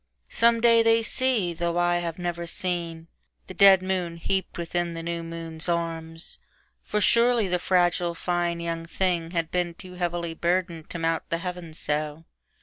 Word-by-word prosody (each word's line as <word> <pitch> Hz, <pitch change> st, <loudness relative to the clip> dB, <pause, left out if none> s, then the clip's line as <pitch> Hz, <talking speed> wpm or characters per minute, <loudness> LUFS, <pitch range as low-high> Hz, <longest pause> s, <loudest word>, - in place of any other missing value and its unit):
Some 230 Hz, 0 st, +4 dB
day 230 Hz, -1 st, +6 dB
they 225 Hz, 0 st, +4 dB
see, 230 Hz, -8 st, +1 dB
though 170 Hz, 0 st, -2 dB
I 175 Hz, 0 st, +3 dB
have 170 Hz, -2 st, -3 dB
never 175 Hz, -1 st, -3 dB
seen, 170 Hz, -2 st, -2 dB, 0.4 s
The -, -, -9 dB
dead 195 Hz, -1 st, +7 dB
moon 180 Hz, -3 st, -2 dB
heaped 190 Hz, +3 st, -2 dB
within 170 Hz, 0 st, -2 dB
the 165 Hz, -, -5 dB
new 170 Hz, 0 st, -3 dB
moon's 165 Hz, 0 st, -5 dB
arms; 165 Hz, -1 st, -2 dB, 0.4 s
For 210 Hz, -, -2 dB
surely 235 Hz, +1 st, +4 dB
the 180 Hz, 0 st, 0 dB
fragile, 175 Hz, -1 st, +2 dB
fine 175 Hz, 0 st, -1 dB
young 165 Hz, -1 st, -4 dB
thing 175 Hz, -2 st, 0 dB
had 165 Hz, -2 st, -2 dB
beenToo 180 Hz, +1 st, -3 dB
heavily 170 Hz, -1 st, -2 dB
burdened 170 Hz, -1 st, -1 dB
to -, -, -5 dB
mount 165 Hz, 0 st, -1 dB
the 165 Hz, -, 0 dB
heavens 175 Hz, -2 st, -6 dB
so. 150 Hz, +1 st, -2 dB
175 Hz, 160 wpm, -26 LUFS, 165-185 Hz, 0.4 s, dead